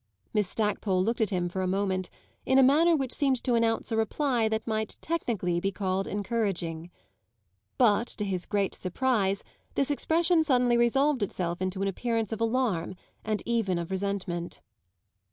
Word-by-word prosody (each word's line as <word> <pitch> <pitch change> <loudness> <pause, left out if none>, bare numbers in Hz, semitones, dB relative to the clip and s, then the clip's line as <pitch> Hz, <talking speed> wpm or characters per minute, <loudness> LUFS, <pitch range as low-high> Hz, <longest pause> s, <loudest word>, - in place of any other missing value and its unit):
Miss 210 -3 +1
Stackpole 210 -3 0
looked 230 +3 -1
at 215 - +2
him 180 -3 0
for 185 +2 -3
a 185 - 0
moment 190 -1 -1 0.3
in 265 - +2
a 270 - +7
manner 320 +6 +5
which 265 -4 -1
seemed 270 -4 +1
to 250 - +1
announce 230 0 +1
a - - +1
reply 230 +1 +1
that 220 0 -2
might 220 -1 -2
technically 220 - -1
be 195 +3 -1
called 190 0 -2
encouraging. 195 -6 -2 0.9
But 235 -1 +4
to 210 - -2
his 185 -3 -3
great 200 -2 0
surprise 195 0 0 0.3
this 275 +1 +1
expression 330 +3 +3
suddenly 250 -5 +3
resolved 265 +3 +2
itself 180 -3 -2
into 185 +1 -2
an - - 0
appearance 225 +2 -1
of 225 0 -4
alarm 225 -7 0 0.3
and 215 -1 -2
even 225 -6 0
of 170 +1 -4
resentment. 190 -3 -3
215 Hz, 165 wpm, -28 LUFS, 190-245 Hz, 0.9 s, a